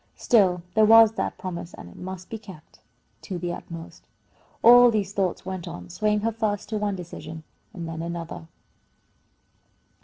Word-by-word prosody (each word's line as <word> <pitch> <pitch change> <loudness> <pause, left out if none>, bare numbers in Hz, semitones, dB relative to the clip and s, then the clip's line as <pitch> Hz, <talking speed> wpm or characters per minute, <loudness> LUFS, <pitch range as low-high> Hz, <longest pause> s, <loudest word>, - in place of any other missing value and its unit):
Still, 185 -7 +3
there 220 - +4
was 225 0 +8
that 225 - -3
promise, 175 -2 -6
and - - -11
it 85 - -14
must 185 0 -8
be 225 - -5
kept 190 -7 -14 0.4
to 185 - -5
the 175 0 -3
utmost. 165 -1 -10 0.6
All 245 +1 +9
these 205 -4 -1
thoughts 190 -4 -1
went 185 -2 -5
on, 90 0 -8
swaying 210 -1 0
her 230 +2 0
first 215 -2 -2
to 215 -1 -2
one 205 -1 -1
decision 160 -3 -8 0.3
and 170 -3 -7
then 165 0 -5
another. 170 -1 -6
190 Hz, 160 wpm, -25 LUFS, 170-215 Hz, 0.6 s, All